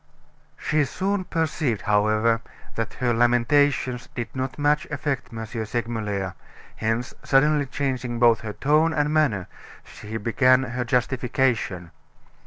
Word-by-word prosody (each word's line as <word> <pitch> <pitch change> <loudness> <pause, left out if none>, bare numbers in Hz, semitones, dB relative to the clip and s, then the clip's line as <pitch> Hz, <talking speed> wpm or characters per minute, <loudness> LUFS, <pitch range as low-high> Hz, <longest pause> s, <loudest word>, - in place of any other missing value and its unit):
She 155 0 +1
soon 190 +6 -2
perceived, 155 - -1
however, 110 +2 +2 0.3
that 115 -1 -4
her 120 -1 0
lamentations 120 +2 +2
did 120 +1 -5
not 130 0 -3
much 150 0 +1
affect 145 -3 -3
M. 110 -1 -5
Segmuller, 110 -4 -3 0.4
hence, 115 +2 -1
suddenly 145 +1 +3
changing 130 -3 -2
both 115 -1 +5
her 105 -1 -5
tone 155 +6 +2
and 150 -1 +1
manner, 130 - +1 0.4
she 110 +2 -7
began 130 +4 +3
her 125 -1 -3
justification. 120 -7 0
125 Hz, 120 wpm, -24 LUFS, 115-145 Hz, 0.4 s, both